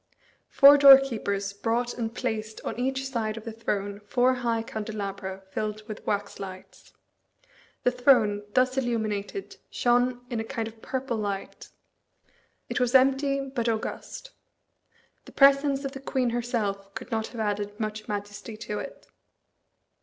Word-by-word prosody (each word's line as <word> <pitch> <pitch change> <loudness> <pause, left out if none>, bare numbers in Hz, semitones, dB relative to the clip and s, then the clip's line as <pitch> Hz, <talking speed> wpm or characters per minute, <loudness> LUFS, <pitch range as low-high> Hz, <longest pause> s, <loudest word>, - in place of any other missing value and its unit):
Four 285 +1 +8
doorkeepers 235 -8 +5
brought 235 +4 -1
and 225 -2 -3
placed 220 -3 -4
on - - -4
each 265 +1 -1
side 225 -4 -2
of 225 - -7
the 230 - -6
throne 205 -2 -3
four 245 +5 +2
high 235 -2 -1
candelabra 200 -3 -5
filled 215 +1 -4
with 215 - -7
wax 205 -1 -2
lights. 185 -1 -10 0.9
The 250 - +3
throne, 245 -5 +3
thus 255 0 +3
illuminated, 225 - -3
shone 245 0 +1
in 235 - -1
a - - -1
kind 225 -1 -4
of 225 0 -12
purple 260 -3 -3
light. 200 -2 -5 1.0
It - - -2
was 250 +1 +1
empty 275 +1 +4
but 260 -4 -2
august. 230 - -4 0.9
The - - -14
presence 275 0 +4
of 275 - -3
the 270 - -8
queen 260 -3 0
herself 210 -5 -2
could - - -8
not 220 -1 -1
have 235 - -9
added 205 0 -2
much 215 -1 -4
majesty 205 +1 -6
to 210 -1 -4
it. - - -9
230 Hz, 145 wpm, -27 LUFS, 210-255 Hz, 1.0 s, Four